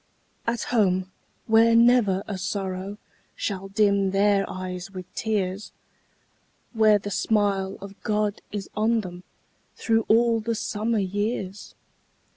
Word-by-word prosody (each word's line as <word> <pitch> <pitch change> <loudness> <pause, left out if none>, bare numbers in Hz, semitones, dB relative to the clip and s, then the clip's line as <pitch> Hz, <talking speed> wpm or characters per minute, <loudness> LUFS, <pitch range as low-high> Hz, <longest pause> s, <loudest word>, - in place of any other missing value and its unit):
At 235 -1 0
home, 185 -4 +2 0.3
where 225 +1 +5
never 230 -5 +4
a 205 - -3
sorrow 190 +1 -4 0.4
Shall 195 -2 -3
dim 200 -1 +2
their 195 0 +2
eyes 185 0 -5
with 185 -2 -8
tears! 205 -2 -2 1.0
Where 215 -2 +5
the 205 0 -6
smile 200 -2 0
of 200 0 -11
God 210 -1 -1
is 200 -2 -4
on 220 +2 +2
them 180 -2 -8 0.5
Through 225 -1 +1
all 230 +1 +4
the 230 +1 -2
summer 220 +2 -1
years! 205 0 -3
205 Hz, 120 wpm, -25 LUFS, 190-220 Hz, 1.0 s, where